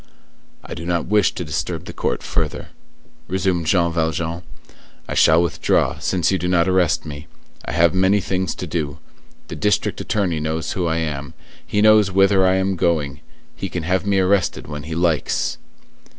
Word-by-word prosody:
"I - - -8
do 85 - -7
not 85 0 -1
wish 105 0 +3
to 90 - -4
disturb 75 - -3
the - - -8
court - - -2
further," - - -3 0.6
resumed 95 -3 -1
Jean 85 -1 +3
Valjean. 80 +1 -1 0.7
"I - - -4
shall 80 +2 +5
withdraw, 85 - 0
since 90 -2 0
you 95 - +1
do 90 - -2
not 90 -1 +2
arrest 95 -3 +2
me. 75 +1 -8 0.4
I - - -4
have 85 0 +4
many 95 +2 +3
things 95 -1 -2
to - - -5
do. 80 -3 -3 0.5
The - - -6
district 105 0 0
attorney 95 -7 -1
knows 80 +1 -2
who 90 -2 -1
I 80 0 0
am; 75 -4 -4 0.3
he 105 - 0
knows 110 -2 +6
whither 95 0 +4
I 95 - +3
am 95 0 0
going; 75 -5 0 0.4
he - - -5
can 85 - -4
have 90 +2 0
me 100 -1 +1
arrested 95 0 +1
when 75 0 -7
he 80 - -3
likes." 85 -3 0
85 Hz, 180 wpm, -21 LUFS, 80-95 Hz, 0.7 s, knows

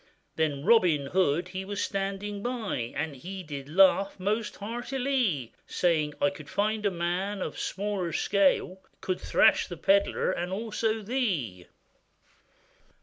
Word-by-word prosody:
Then 150 -2 -1
Robin 180 -10 +4
Hood 175 +2 +1
he 190 +1 -4
was 200 +1 -5
standing 200 +1 -2
by, 220 - -3
And 150 -1 -2
he 185 +7 -7
did 145 -3 -7
laugh 195 +3 +4
most 210 +3 -1
heartilie, 240 - -1
Saying, 155 -4 +1
'I 190 - +3
could 190 - -11
find 210 +1 0
a - - +3
man 185 +3 -2
of - - -3
a - - -13
smaller 195 -3 -2
scale, 190 +1 +2 0.2
Could 185 -1 -3
thrash - - +4
the 175 - -7
pedlar, 200 +2 +2
and 175 0 -3
also 220 +1 -1
thee. 180 - -2
190 Hz, 140 wpm, -28 LUFS, 170-210 Hz, 0.2 s, Robin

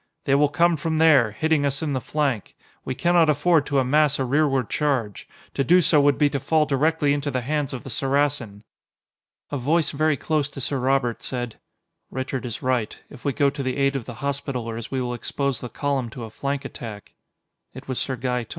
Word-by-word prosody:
"They 135 - +2
will 145 +1 +4
come 170 +3 +3
from 160 0 -1
there, 150 -8 +5
hitting 155 +7 +1
us 140 +2 -1
in 150 -3 -1
the 130 - -1
flank; 135 -4 -2 0.3
we 130 - -4
cannot 170 +1 +3
afford 150 +1 +3
to 140 - 0
amass 145 +2 +3
a 135 - -1
rearward 135 -2 +1
charge. 130 -9 -1 0.2
To 135 - 0
do 175 +7 +5
so 155 -3 +4
would 140 -1 +3
be 150 - +4
to 140 - -1
fall 155 +3 +2
directly 150 +1 +2
into 145 0 -2
the 130 -2 -1
hands 145 +2 -1
of 130 -1 -6
the 135 - -7
Saracen." 135 -6 -1 0.9
A 145 - -2
voice 155 +4 +1
very 155 0 +1
close 150 -1 0
to 140 - -9
Sir 135 +1 -2
Robert 125 -2 +1
said: 120 -3 -5 0.5
"Richard 130 0 -4
is 115 - -6
right. 125 -4 0
If 135 - -13
we 140 - +1
go 140 0 +2
to 140 - -5
the 130 -1 -2
aid 140 0 +2
of 130 -5 -3
the 120 - -8
Hospitallers, 125 -5 -3
we 135 - -2
will 125 -1 -2
expose 130 +1 -2
the 125 - -6
column 140 -4 -2
to 115 +2 -8
a 110 - -8
flank 140 +3 -3
attack." 105 -4 -8 0.6
It 130 +1 -10
was 130 -2 -2
Sir 130 - -2
Gaeton. 125 -1 -2
140 Hz, 210 wpm, -24 LUFS, 125-150 Hz, 0.9 s, there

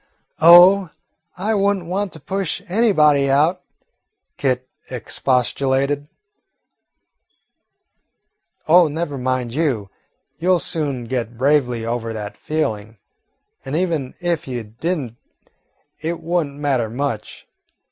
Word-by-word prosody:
"Oh, 175 +3 +8 0.5
I 210 +5 0
would 200 -1 +2
n't 180 - -9
want 190 +3 -2
to 160 - -8
push 195 -1 -3
anybody 155 -9 +3
out," 155 +7 +2 0.7
Kit 130 -2 -1 0.2
expostulated. 135 +3 0 2.6
"Oh, 170 +1 +6
never 155 0 -3
mind, 125 -2 -2
you 130 -10 -1 0.5
'll 180 +1 +3
soon 150 -7 -2
get 120 -1 -4
bravely 125 -4 +1
over 115 -1 -3
that 105 -2 -6
feeling, 110 -8 -3 0.7
and 135 +2 -4
even 160 -7 -1
if 175 -4 -2
you 125 -3 -4
did 125 +13 -3
n't 120 -6 -7 0.8
it 165 +2 -3
would 170 -1 -1
n't 140 - -13
matter 135 -6 0
much. 120 -2 -4
145 Hz, 110 wpm, -20 LUFS, 125-170 Hz, 2.6 s, Oh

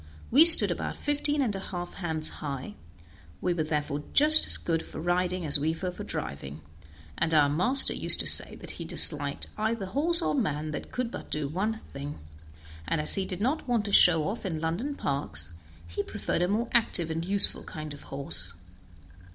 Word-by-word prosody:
We 290 +7 +6
stood 335 - +10
about - - -5
fifteen 290 0 -2
and 215 -6 -3
a - - -5
half 175 -2 -8
hands 160 -4 -3
high; 140 -6 -7 0.7
we 180 - -2
were 170 - -4
therefore 150 -2 -4
just 310 +2 +6
as - - +6
good 165 -1 -3
for - - -11
riding 180 +1 -3
as 145 -1 +2
we 160 +3 -3
were 185 -1 -4
for - - -10
driving, 70 +2 -7 0.6
and 160 0 -1
our 145 -2 +3
master 245 - +3
used - - +8
to - - -4
say - - +4
that - - -11
he - - -9
disliked - - +1
either 220 -1 -3
horse 330 - 0
or - - -2
man 155 - -3
that 150 - -8
could 250 -2 -5 0.2
do 150 -1 -4
but 145 - -11
one 210 +4 -2 0.2
thing; 140 +1 -8 0.7
and 165 - -2
as 150 - +3
he 195 - -1
did 185 0 -7
not 270 +6 -3
want 235 -4 -1
to 205 - -5
show 165 -5 +5
off 210 +4 -6
in 170 -6 -5
London 175 - -4
parks, 85 - -5 0.4
he 85 - -5
preferred - - -5
a 175 - 0
more 220 +5 -2
active 185 -8 0
and 165 +1 -4
useful 200 +3 +1
kind 155 -1 -9
of 145 - -14
horse. 95 -10 -1
175 Hz, 195 wpm, -26 LUFS, 150-225 Hz, 0.7 s, stood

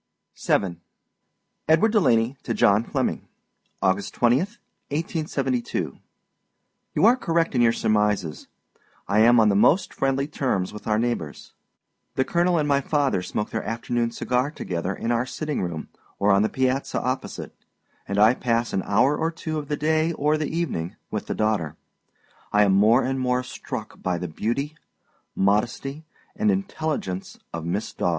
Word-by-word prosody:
VII. 90 -4 +2 0.9
EDWARD 165 +8 +5
DELANEY 130 - +3
TO 115 - -3
JOHN 100 +3 +4
FLEMMIMG. - - -1 0.6
August 95 +1 0
20, 120 +1 +4
1872. 155 - -3 1.0
You - - +4
are 235 +3 +7
correct 165 -9 0
in 125 - +2
your 115 -1 +5
surmises. 105 -8 0 0.6
I 100 +2 +2
am 120 +2 +6
on 110 -1 +5
the 100 - +2
most 140 - +3
friendly 135 0 0
terms 125 -12 -1
with 105 - -9
our 105 -1 +2
neighbors. 115 -10 -3 0.6
The 130 - +1
colonel 175 +2 +2
and 150 -2 +1
my 140 -1 +3
father 140 - +1
smoke 105 +3 -3
their 110 - -2
afternoon 115 +1 -1
cigar 125 +3 0
together 90 - -3
in 115 - -2
our 120 +2 +1
sitting 150 +2 -3
room 85 -3 -4 0.3
or 100 +1 +3
on 100 0 +5
the 110 - +2
piazza 130 +1 0
opposite, 130 +1 -4 0.5
and 100 - -2
I 110 +3 +6
pass 120 -2 -1
an 95 - +1
hour 125 +8 +3
or 160 +2 0
two 160 -1 -4
of 145 - -7
the 150 0 -2
day 155 +2 +1
or 150 0 +1
the 155 -1 -2
evening 150 - -2 0.2
with - - -3
the - - -2
daughter. 105 -8 0 0.8
I 105 0 +5
am 100 -2 +3
more 110 +6 +5
and 135 +1 -1
more 125 0 +1
struck 125 - -7
by 90 -1 0
the 90 - -4
beauty, 120 - -2 0.6
modesty, 120 +9 0 0.3
and 215 0 +1
intelligence 155 - -2 0.2
of 85 -1 -4
Miss 95 +6 -2
Daw. - - 0
120 Hz, 160 wpm, -24 LUFS, 105-150 Hz, 1.0 s, are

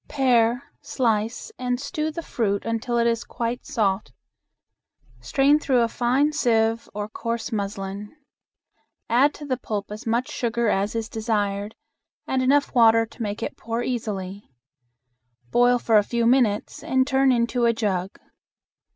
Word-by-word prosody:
Pare, 245 -3 +2 0.2
slice, 225 -2 -1
and 250 -1 -1
stew 305 +3 -3
the 330 +2 -6
fruit 200 -8 -1
until 230 +1 -1
it 235 - +2
is 230 0 +1
quite 235 +1 -4
soft. 210 -9 0 1.1
Strain 270 - +3
through 260 -5 +2
a 230 - +3
fine 255 +6 +1
sieve 225 -4 +1
or 210 0 -3
coarse 230 +1 -4
muslin. 200 -1 -4 1.0
Add 270 +5 +4
to 295 - -9
the 260 -3 -1
pulp 210 -4 -4
as 215 +2 -8
much 235 +3 0
sugar 235 -1 0
as 200 +2 0
is 225 -1 -2
desired 210 -2 -2 0.5
and 260 -1 0
enough 280 +2 +2
water 225 -2 +5
to 235 - -14
make 205 -1 -3
it - - -4
pour 230 +1 -3
easily. 205 -5 -4 1.0
Boil 245 0 +4
for 225 -3 +4
a - - +1
few 235 +2 -1
minutes 235 -4 +1
and 260 0 +2
turn 270 0 +3
into 235 0 +1
a 235 - +5
jug. 195 -5 -2
230 Hz, 150 wpm, -24 LUFS, 215-250 Hz, 1.1 s, water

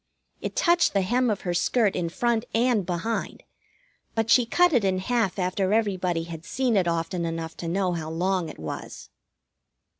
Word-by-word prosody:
It - - -4
touched 345 -8 +3
the 195 -1 +2
hem 245 +5 +1
of 210 - -1
her 175 - -2
skirt 210 +3 +2
in 170 -1 -1
front 235 +4 0
and 230 -5 +2
behind; 185 +6 -3 0.7
but 225 0 0
she 245 -2 +5
cut 355 +7 +3
it 240 -5 +3
in 190 -1 +1
half 210 0 0
after 185 +1 0
everybody 185 -6 0
had 165 -1 -8
seen 250 +4 0
it 185 -3 +2
often 170 +1 -1
enough 165 -1 -4
to 170 - -5
know 180 +1 0
how 160 -2 -4
long 180 +1 -1
it - - -10
was. 80 -1 -7
190 Hz, 180 wpm, -25 LUFS, 170-230 Hz, 0.7 s, she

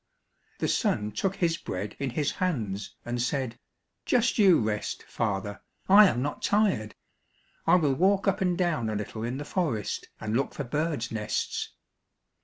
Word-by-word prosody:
The - - -1
son 105 0 0
took 195 - -1
his 170 -3 +1
bread 100 - -5
in 140 - -1
his 140 +4 0
hands, 110 - -2
and 120 0 -2
said, 130 -2 -2 0.4
"Just 240 -1 +2
you 195 -4 +7
rest, 105 -1 -2
father, 100 -2 -3 0.3
I 205 +2 +9
am 125 -8 0
not 145 - -3
tired; 200 - +1 0.7
I - - +7
will 150 -6 +3
walk 195 +7 +2
up 195 - +2
and 180 -2 +1
down 165 -11 0
a 110 - -2
little 105 +2 -4
in 120 +3 -2
the 145 - -5
forest, 145 - -2
and 110 0 -2
look 135 +3 0
for 145 - -3
birds' 150 -1 -2
nests." 110 -1 -2
135 Hz, 165 wpm, -28 LUFS, 110-180 Hz, 0.7 s, I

